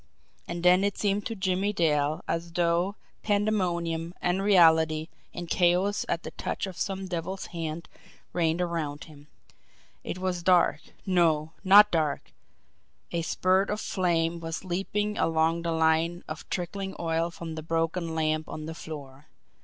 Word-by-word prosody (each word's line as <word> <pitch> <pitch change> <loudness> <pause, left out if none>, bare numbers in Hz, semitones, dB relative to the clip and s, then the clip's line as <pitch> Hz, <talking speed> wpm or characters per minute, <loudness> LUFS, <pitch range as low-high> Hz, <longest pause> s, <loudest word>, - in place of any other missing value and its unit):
And 170 0 -5
then 180 +2 +5
it 200 -1 0
seemed 205 0 0
to 225 - -5
Jimmie 190 +1 0
Dale 150 -4 +1
as 165 0 -3
though 175 +3 +1 0.3
pandemonium, 175 -5 0
unreality, 165 -4 +3 0.2
and 175 -1 -6
chaos 180 +4 +2
at 170 - -1
the - - -6
touch - - -3
of 190 -2 -7
some 195 +1 -3
devil's 185 +2 -4
hand 165 0 -4 0.5
reigned 165 0 +1
around 160 -4 -2
him. 150 -2 -15 0.8
It - - -4
was 185 -1 -2
dark 180 0 +3 0.2
no, 165 -5 +2
not 205 +2 +8
dark 155 -4 -1 0.8
a 170 - -1
spurt 185 +3 +1
of 210 - -1
flame 170 -4 0
was 165 +2 -5
leaping 205 +4 -2
along 165 +1 +2
the 170 0 -2
line 160 +2 +1
of 155 0 -8
trickling 190 +2 -4
oil 165 0 0
from 170 -1 -7
the 160 - -5
broken 165 +1 -1
lamp 155 -1 0
on 155 - -6
the 160 - -5
floor. 145 -3 -9
170 Hz, 145 wpm, -27 LUFS, 160-185 Hz, 0.8 s, not